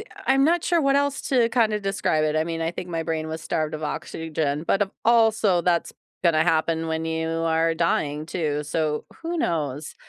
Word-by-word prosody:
uh - - -6 0.2
I'm 270 +1 +4
not 340 +2 +3
sure 345 -2 +2
what 275 0 +3
else 285 +1 +1
to 245 -4 +4
kinda 220 -3 +2
describe 195 -6 0
it, 155 0 0
I 155 - +2
mean, 165 0 -4
I 165 0 0
think 180 +1 -6
my 165 -1 -2
brain 160 -1 -2
was 160 0 -5
starved 155 -1 -2
of 155 - -6
oxygen, 155 0 -3
but 195 - +2
of 195 - -2
also 220 -6 +4
that's 170 0 +1 0.3
gonna 155 -2 +4
happen 160 0 +1
when 160 0 -2
you 160 0 -2
are 165 0 +1
dying, 155 -2 0
too, 150 -4 -2
so 150 0 -1 0.2
who 335 0 -3
knows? 150 - -2
165 Hz, 200 wpm, -24 LUFS, 155-210 Hz, 0.3 s, I'm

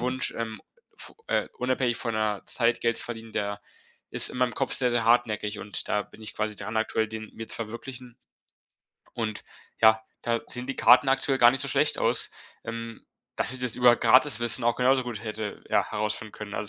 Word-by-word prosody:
Wunsch, 125 +1 -2
ähm, 115 -1 -5 0.4
f - - -11
äh, - - 0
unabhängig 125 -1 0
von 115 -2 -3
der 105 -2 -1
Zeit 120 -1 0
Geld 115 -1 +1
zu - - +1
verdienen, 115 -1 -7
der 100 0 -3 0.5
ist - - +1
in - - -7
meinem 125 -2 +1
Kopf 135 - -1
sehr, 125 -2 +2
sehr 120 -1 0
hartnäckig 110 -3 +1
und 105 - -4
da 105 - +1
bin 110 - -16
ich 110 - -6
quasi 105 -1 -2
dran 110 - -5
aktuell, 110 0 0
den 110 0 -7
mir 115 - -7
zu - - -3
verwirklichen. 120 +2 -7 1.0
Und 110 -2 -3 0.4
ja, 110 0 +6 0.2
da 115 -1 0
sehen 125 +1 +1
die 135 - -4
Karten 130 +2 +6
aktuell 135 0 +1
gar 120 -1 +7
nicht 130 +1 0
so - - +2
schlecht - - +2
aus, - - +1 0.3
ähm, 115 0 -7 0.3
dass - - +3
ich 130 - 0
das 125 -3 +2
über 125 -1 +5
Gratiswissen 120 -3 +4
auch 120 0 +2
genauso 130 +1 +3
gut 120 -4 -6
hätte, 110 -2 -4
ja, - - +2
herausfinden 105 0 -3
können. 105 -1 -8
Also, 100 0 -3
115 Hz, 200 wpm, -26 LUFS, 110-125 Hz, 1.0 s, gar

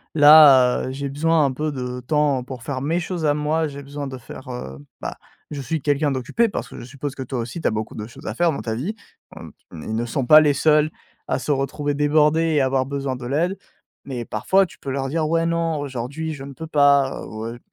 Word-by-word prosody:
là, 145 -5 +7
heu, - - -4
j'ai 140 +1 -4
besoin 155 +2 +2
un 135 - +1
peu 150 +4 -2
de 125 -2 -5
temps 140 0 +1
pour 125 -2 -9
faire 130 0 -4
mes 160 +5 0
choses 175 -1 -3
à 145 -1 +3
moi, 155 +2 0
j'ai 140 -1 -8
besoin 140 +1 -6
de 130 -1 -7
faire, 130 +2 -11
heu, 65 - -7 0.2
bah, - - -5 0.3
je 145 -2 -4
suis 160 +4 -2
quelqu'un 145 +1 +1
d'occupé» 140 - 0
parce - - -4
que - - -10
je - - -8
suppose 140 +2 -6
que 140 - -8
toi 130 0 -4
aussi 125 +9 -6
tu - - +1
as - - +2
beaucoup 110 0 -4
de 105 0 -6
choses 130 +4 -14
à - - -3
faire 175 -1 +2
dans 140 - -4
ta 110 - -2
vie, 155 - -3 0.4
hem, - - -10 0.2
ils 85 +7 -7
ne 115 +1 -1
sont 130 +2 -2
pas 155 +5 +9
les 150 -2 +3
seuls 150 +1 +3 0.4
à - - 0
se 130 +3 -3
retrouver 145 +1 -1
débordés 150 +2 +3
et 145 - +4
avoir 130 0 +1
besoin 140 -1 -3
de 125 -1 -7
l'aide, 165 +8 0 0.5
mais 125 -4 -5
parfois 190 - +2
tu 170 - -16
peux - - -7
leur 135 0 -2
dire: 155 +2 0
«Ouais, 165 0 +1
non, 165 -1 0
aujourd'hui, 145 +3 -4
je 135 -2 -8
ne 140 0 -9
peux 160 +4 -8
pas 140 -3 +3
ou 110 0 -7
heu, 115 +1 -6
140 Hz, 245 wpm, -22 LUFS, 130-155 Hz, 0.5 s, pas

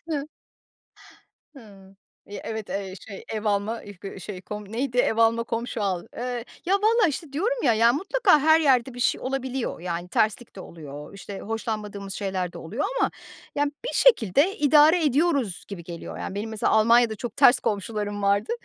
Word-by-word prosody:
Hıı. 295 -2 -2 1.3
Hıı. 195 -6 -15 0.3
Eee, 205 - -7
evet, 220 -2 -5
eee, 195 -1 -4
şey 200 -2 -9
ev 215 0 -4
alma 205 +2 +1
ıh 205 -5 -11
gı 195 -1 -7
şey 190 -1 -7
kom 210 +1 -8
neydi 245 +1 -2
ev 225 -2 +2
alma 230 0 +3
komşu 230 -1 -3
al. 185 -3 -1
Eee, 245 0 -3 0.2
ya 375 - +2
vallahi, 430 -1 +3
işte, 295 -1 -6
diyorum 460 +11 -1
ya, 240 -4 +4
ya 230 +2 +4
mutlaka 380 - +3
her 315 +2 +5
yerde 260 -4 +3
bir 245 - -9
şey - - +1
olabiliyor. 260 -5 -3
Yani 175 0 -4
terslik 215 +3 0
de - - -9
oluyor, 150 -1 -10
işte, 200 0 -8
hoşlanmadığımız 210 -3 -4
şeyler 190 -3 -3
de - - -8
oluyor 210 - -4 0.2
ama, - - +2 0.4
yani, 290 0 +1
bir - - -3
şekilde 345 - +4
idare 305 +3 +5
ediyoruz 280 - +1
gibi 185 -4 -8
geliyor. 170 -1 -8
Yani, 195 - -5
benim 215 +2 -3
mesela 220 -1 0
Almanya'da 230 +1 +4
çok 230 0 -6
ters 245 - +6
komşularım 205 0 -3
vardı, 200 - +2
225 Hz, 175 wpm, -25 LUFS, 200-275 Hz, 1.3 s, ters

